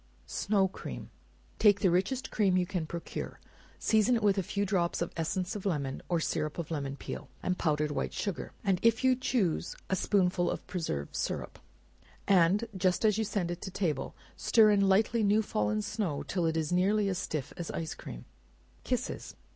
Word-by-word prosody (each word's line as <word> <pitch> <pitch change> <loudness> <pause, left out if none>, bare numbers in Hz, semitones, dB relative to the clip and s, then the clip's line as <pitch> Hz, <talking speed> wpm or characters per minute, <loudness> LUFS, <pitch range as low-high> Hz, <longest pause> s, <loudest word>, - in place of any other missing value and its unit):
Snow 195 - +1
Cream. 185 - -8 0.5
Take 205 -2 +5
the 185 - +4
richest 200 +9 0
cream 195 -4 +3
you 180 - +2
can 175 -4 -3
procure, 170 +1 -6 0.4
season 220 +3 +3
it 225 - -1
with 200 -1 +4
a - - +2
few 200 +3 -1
drops 180 -3 0
of 170 - -2
essence 180 +4 -2
of 205 - -5
lemon, 140 -8 -2
or 175 -2 +2
syrup 155 -1 -2
of 170 -2 -4
lemon 140 -3 -2
peel, - - -7
and 180 - +1
powdered 150 -1 +1
white - - -2
sugar, 200 -5 -3
and 195 -3 +2
if 230 0 +3
you 260 -1 +5
choose 240 -9 0 0.2
a - - +4
spoonful 180 -2 +2
of - - -4
preserve 115 - -3
syrup, - - -3 0.7
and 195 +3 +4
just 185 +2 +1
as 215 0 +3
you - - +2
send 200 -5 -1
it 175 - -5
to 190 - -5
table, 160 -8 -2 0.2
stir 220 -2 +5
in 200 -1 +4
light 210 +4 +3
newly 215 -2 +3
fallen 105 - 0
snow 180 - -2
till 175 -3 -1
it 160 0 0
is 155 -1 -1
nearly 200 +3 +3
as 185 -2 -1
stiff 150 -4 -4
as 175 - -5
ice 160 -1 -3
cream. - - -9 0.6
Kisses. - - -3
185 Hz, 185 wpm, -30 LUFS, 165-205 Hz, 0.7 s, Take